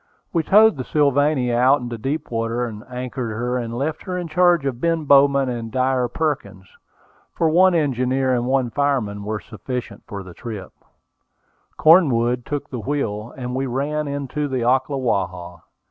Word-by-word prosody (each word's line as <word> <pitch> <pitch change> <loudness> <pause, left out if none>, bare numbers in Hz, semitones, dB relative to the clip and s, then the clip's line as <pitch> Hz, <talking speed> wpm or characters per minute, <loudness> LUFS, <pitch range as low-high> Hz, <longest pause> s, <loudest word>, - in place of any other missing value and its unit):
We 165 - +2
towed 210 +2 +5
the 130 - -3
Sylvania 140 -2 +2
out 130 +4 +4
into 120 -2 -5
deep 140 +7 -4
water, 115 +1 -1 0.2
anchored 125 -2 -4
her, 125 +2 -1
and 115 -1 -5
left 150 +4 -2
her 185 -2 -3
in 175 -1 -4
charge 175 -2 +3
of 130 -3 -3
Ben 165 -1 +1
Bowman 140 -1 +5
and 115 -2 -4
Dyer 130 0 +1
Perkins, 135 -9 -3 0.7
for 165 - +2
one 185 +2 +5
engineer 130 -3 +1
and 120 0 0
one 130 -2 +1
fireman 120 -7 -1
were 105 +1 -3
sufficient 125 +2 -6
for 100 -1 -6
the 90 -1 -11
trip: 105 -3 -8 1.0
Cornwood 125 -8 +4
took 145 -1 -3
the 125 - -4
wheel, 115 -4 -3
and 125 -1 -5
we 135 +1 -1
ran 145 +4 -2
into 145 +1 -3
the 130 -3 -2
Ocklawaha. 115 -9 -1
130 Hz, 160 wpm, -21 LUFS, 120-145 Hz, 1.0 s, towed